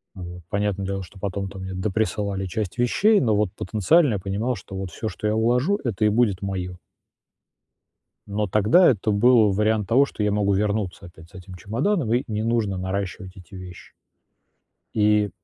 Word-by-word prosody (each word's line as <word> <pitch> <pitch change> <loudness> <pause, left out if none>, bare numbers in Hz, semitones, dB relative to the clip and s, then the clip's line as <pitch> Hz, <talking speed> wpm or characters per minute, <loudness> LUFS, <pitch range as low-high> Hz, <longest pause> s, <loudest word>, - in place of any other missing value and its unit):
Вот. 90 -1 -9
Понятное 100 -1 -1
дело, 95 0 -3
что 95 +2 -13
потом 100 0 -3
там 95 -1 -9
мне 95 0 -6
доприсылали 100 0 -2
часть 100 +4 -4
вещей, 205 - +3
но 110 -4 +2
вот 105 -3 0
потенциально 120 - +2
я - - -1
понимал, 105 +7 -2
что 100 -3 -9
вот 95 -2 -5
всё, 110 - -4
что 105 - -5
я 105 - +1
уложу,- 125 - +1
это 110 -3 -1
и - - +5
будет 105 -3 +1
моё. 90 -2 -4 1.5
Но 105 +1 -1
тогда 110 - +5
это 110 -2 0
был 110 -1 +4
вариант 105 0 +1
того, 135 +4 +4
что 105 - -6
я 105 -1 +1
могу 100 -1 +1
вернуться 100 -3 -2
опять 85 -1 -15
с - - -26
этим 95 0 -11
чемоданом 120 - -1
и 125 - +1
не 110 -1 -3
нужно 110 -5 0
наращивать 95 0 -4
эти 95 +1 -14
вещи. 90 -1 -11 1.0
И, 105 -1 +3
105 Hz, 180 wpm, -23 LUFS, 95-110 Hz, 1.5 s, и